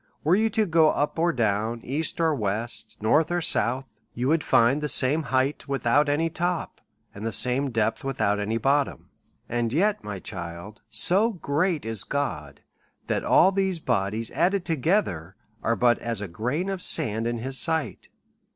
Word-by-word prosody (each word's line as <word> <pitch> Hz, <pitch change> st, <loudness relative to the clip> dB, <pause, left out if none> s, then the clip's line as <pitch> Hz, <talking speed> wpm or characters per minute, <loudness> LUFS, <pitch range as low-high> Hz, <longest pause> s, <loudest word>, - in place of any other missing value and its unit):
Were 160 Hz, -, +3 dB
you 220 Hz, +2 st, +2 dB
to 220 Hz, 0 st, +1 dB
go 160 Hz, -3 st, +4 dB
up 150 Hz, +2 st, -1 dB
or 170 Hz, +1 st, +3 dB
down, 110 Hz, -2 st, -1 dB
east 155 Hz, +6 st, -2 dB
or 165 Hz, -2 st, +2 dB
west, 110 Hz, -1 st, -4 dB
north 150 Hz, +9 st, +3 dB
or 175 Hz, -, +1 dB
south, 130 Hz, -4 st, 0 dB, 0.3 s
you 125 Hz, +2 st, -1 dB
would 160 Hz, -1 st, +2 dB
find 120 Hz, +6 st, +3 dB
the 150 Hz, -, -1 dB
same 145 Hz, +3 st, +3 dB
height 135 Hz, 0 st, -1 dB
without 140 Hz, +2 st, +2 dB
any 155 Hz, +3 st, +1 dB
top, 175 Hz, +1 st, -3 dB, 0.3 s
and 100 Hz, -, -9 dB
the 115 Hz, -, -2 dB
same 125 Hz, +4 st, +1 dB
depth 115 Hz, -2 st, -1 dB
without 110 Hz, -7 st, 0 dB
any 105 Hz, +2 st, -1 dB
bottom. 140 Hz, +4 st, 0 dB, 0.4 s
And 120 Hz, -1 st, -1 dB
yet, 200 Hz, -, +1 dB
my 105 Hz, -2 st, -5 dB
child, 90 Hz, +1 st, -8 dB
so 190 Hz, -, +2 dB
great 165 Hz, -, -1 dB
is 110 Hz, -3 st, -2 dB
God, 140 Hz, 0 st, -4 dB, 0.4 s
that -, -, -1 dB
all 190 Hz, -, +5 dB
these 190 Hz, -2 st, 0 dB
bodies 105 Hz, -4 st, -1 dB
added 180 Hz, +5 st, +1 dB
together 130 Hz, -, 0 dB, 0.3 s
are 115 Hz, -, +1 dB
but 120 Hz, -1 st, +3 dB
as 115 Hz, -3 st, -3 dB
a 105 Hz, -, -4 dB
grain 125 Hz, -, -2 dB
of 195 Hz, -2 st, -3 dB
sand 115 Hz, -10 st, +1 dB
in 120 Hz, 0 st, -2 dB
his 130 Hz, +3 st, 0 dB
sight. 160 Hz, -2 st, -1 dB
135 Hz, 170 wpm, -25 LUFS, 115-165 Hz, 0.4 s, all